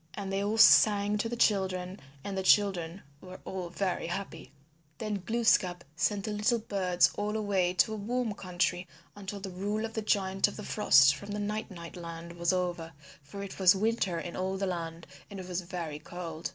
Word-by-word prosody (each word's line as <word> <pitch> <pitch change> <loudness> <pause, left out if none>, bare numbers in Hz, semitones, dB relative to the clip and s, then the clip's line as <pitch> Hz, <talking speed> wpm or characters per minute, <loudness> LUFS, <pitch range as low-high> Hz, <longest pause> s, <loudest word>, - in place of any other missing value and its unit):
And 195 -2 -5
they 195 +1 0
all 210 +2 -1
sang 210 -2 +6
to 230 - -1
the 240 - -3
children 190 -4 0 0.2
and 200 - -4
the 190 - -1
children 190 -3 +2 0.2
were 185 0 -10
all 185 -2 -5
very 185 -1 -2
happy 175 -2 -5
again. 140 - -17 0.4
Then 210 -4 -4
Glooskap 195 -6 +2
sent 200 +3 0
the 215 - -3
little 210 +3 +1
birds 190 -5 +2
all 210 +1 -1
away 195 -4 +1
to 185 +5 +3
a - - -4
warm 230 +2 -2
country 180 -1 -2 0.3
until 200 0 -6
the 195 -1 -6
rule 205 +4 -2
of 225 - -7
the 220 - -2
Giant 195 -2 +1
of 205 - -7
the 210 - -7
Frost 140 -9 +5
from 200 +9 -9
the 210 - -3
Night 210 +1 -3
Night 170 -4 -9
Land 170 -1 -8
was 170 0 0
over, 175 -3 -2 0.3
for 200 +8 -8
it 200 - -8
was 185 0 +6
winter 195 -4 0
in 170 +1 -6
all 190 +1 -2
the 195 - -1
land 170 -2 -4 0.2
and 200 -2 -8
it 185 - -8
was 180 0 -2
very 170 -4 -5
cold. 165 0 -6
190 Hz, 205 wpm, -30 LUFS, 175-205 Hz, 0.4 s, sang